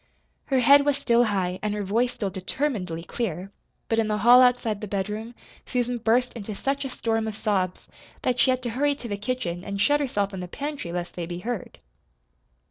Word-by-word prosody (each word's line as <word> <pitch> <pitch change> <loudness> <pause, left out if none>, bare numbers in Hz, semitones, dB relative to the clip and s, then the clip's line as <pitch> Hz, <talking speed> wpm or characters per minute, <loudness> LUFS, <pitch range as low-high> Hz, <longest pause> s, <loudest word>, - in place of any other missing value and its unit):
Her 265 -3 +2
head 280 +3 +7
was 285 -1 +2
still 240 -1 +3
high, 185 -4 -1
and 210 -1 -1
her 210 - -2
voice 230 +6 +1
still 200 -4 -3
determinedly 185 - -2
clear 190 -2 -4 0.4
but 225 - +1
in 220 - +2
the 210 0 0
hall 240 +4 +7
outside 245 -4 +2
the 210 - -4
bedroom, 210 +4 -3 0.3
Susan 245 -1 -1
burst 240 +2 +2
into 215 -2 -6
such 275 +6 -1
a 270 - -4
storm 225 -3 -1
of 215 - -4
sobs 190 -4 -1 0.4
that 250 0 +1
she 260 - +5
had 255 0 +1
to 240 - -2
hurry 285 +4 +1
to 255 - -8
the 205 - -2
kitchen 200 -6 -3
and 200 0 -4
shut 290 +8 +4
herself 205 -8 -1
in 190 - -5
the 180 - -5
pantry 285 - -5
lest 175 0 -4
they 170 -2 -4
be 175 0 -5
heard. 220 +2 -5
225 Hz, 210 wpm, -25 LUFS, 195-250 Hz, 0.4 s, head